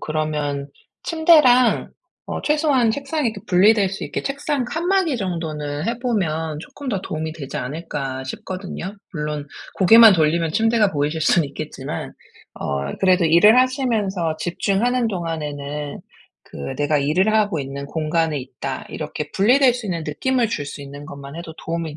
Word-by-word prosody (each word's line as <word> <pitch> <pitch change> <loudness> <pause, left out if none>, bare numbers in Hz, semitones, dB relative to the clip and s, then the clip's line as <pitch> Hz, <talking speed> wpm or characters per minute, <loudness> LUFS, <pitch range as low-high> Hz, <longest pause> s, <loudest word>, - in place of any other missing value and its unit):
그러면 150 -2 -2 0.3
침대랑 305 -7 +4 0.4
어 - - -4
최소한 295 -6 +2
책상이 280 +1 -1
이 - - -10
분리될 195 +2 +4
수 195 - -5
있게 - - -4
책상 275 -1 -2
칸막이 340 0 0
정도는 155 -5 -3
해 235 +1 -1
보면 160 - -1
'쪼끔 280 - -9
더 200 -6 -1
도움이 155 0 -4
되지 140 -5 -7
않을까?' 135 -2 -4
싶거든요. 185 +6 -6 0.2
물론 150 -2 -4 0.3
고개만 220 +2 +8
돌리면 160 0 +1
침대가 225 -1 +3
보이실 150 +2 -1
수는 160 0 +3
있겠지만 140 - -6 0.4
어 70 0 -3
그래도 185 -2 +3
일을 210 +9 +6
하시면서 215 - 0
집중하는 225 +8 0
동안에는 150 -5 -4 0.4
그 - - -13 0.2
'내가 145 0 +1
일을 180 +10 +2
하고 205 -6 +2
있는 140 +1 -6
공간에 160 0 0
있다.' 130 +1 -6
이렇게 150 -1 -5
분리될 250 +5 +4
수 245 -4 -5
있는 170 -4 -3
느낌을 245 - 0
줄 145 -10 -3
수 145 - -8
있는 140 +1 -10
것만 140 -1 -9
해도 165 -2 -8
'도움이 165 -2 -4
170 Hz, 330 characters per minute, -21 LUFS, 150-230 Hz, 0.4 s, 고개만